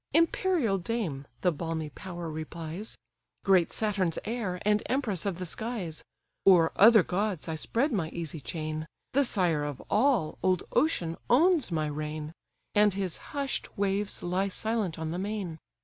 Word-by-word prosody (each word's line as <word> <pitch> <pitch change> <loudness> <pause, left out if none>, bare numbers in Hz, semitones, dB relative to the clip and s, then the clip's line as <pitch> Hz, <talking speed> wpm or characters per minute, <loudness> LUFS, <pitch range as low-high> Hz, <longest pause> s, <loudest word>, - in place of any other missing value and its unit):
"Imperial 330 - +3
dame 170 -10 -3
(the 180 - +3
balmy 160 -1 -3
power 175 -1 -7
replies), 160 +5 -6 0.5
Great 185 -3 +4
Saturn's 200 -6 0
heir, 210 -6 -2
and 210 0 +3
empress 225 - 0
of 190 -4 -1
the 185 - -4
skies! 190 -4 -3 0.4
O'er 170 -4 +7
other 220 -1 +8
gods 190 -2 -1
I 160 - -2
spread 235 - 0
my 180 -9 0
easy 165 -2 -4
chain; 155 +5 -4 0.3
The 280 +2 +4
sire 175 - +1
of 145 -3 -4
all, 225 - +2
old 185 -1 +2
Ocean, 210 - +1
owns 315 - +4
my 155 -2 0
reign. 150 +1 -4 0.4
And 210 -2 +4
his 190 -4 -2 0.2
hush'd 275 -2 -2
waves 200 +1 -1
lie 185 +3 0
silent 215 -3 -1
on 160 0 -3
the 175 - -3
main. 195 -5 -3
185 Hz, 150 wpm, -29 LUFS, 160-220 Hz, 0.5 s, other